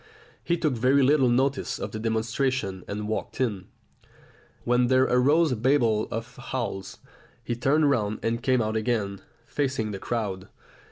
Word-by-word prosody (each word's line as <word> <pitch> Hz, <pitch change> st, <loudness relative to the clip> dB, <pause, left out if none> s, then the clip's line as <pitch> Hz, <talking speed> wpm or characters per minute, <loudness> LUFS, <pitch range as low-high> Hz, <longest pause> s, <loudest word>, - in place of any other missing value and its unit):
He 170 Hz, -, 0 dB
took 155 Hz, -4 st, 0 dB
very 130 Hz, +4 st, +3 dB
little 135 Hz, -1 st, +4 dB
notice 135 Hz, +3 st, +1 dB
of -, -, -5 dB
the 110 Hz, -, -5 dB
demonstration 110 Hz, -2 st, -1 dB
and 105 Hz, +1 st, -4 dB
walked 110 Hz, +2 st, -4 dB
in, 105 Hz, -8 st, -1 dB, 1.0 s
when 125 Hz, 0 st, +2 dB
there 130 Hz, +1 st, +4 dB
arose 145 Hz, +6 st, +3 dB
a -, -, +1 dB
babel 115 Hz, -3 st, +2 dB
of 115 Hz, +2 st, -6 dB
howls. 115 Hz, -7 st, -4 dB, 0.5 s
He 120 Hz, +1 st, -2 dB
turned 145 Hz, +5 st, +2 dB
round 110 Hz, -6 st, +1 dB
and 115 Hz, +1 st, -1 dB
came 130 Hz, -2 st, +2 dB
out 110 Hz, 0 st, -2 dB
again, 110 Hz, -4 st, -1 dB, 0.2 s
facing 130 Hz, -7 st, -2 dB
the 100 Hz, -, -5 dB
crowd. 100 Hz, -6 st, -3 dB
120 Hz, 155 wpm, -26 LUFS, 110-130 Hz, 1.0 s, little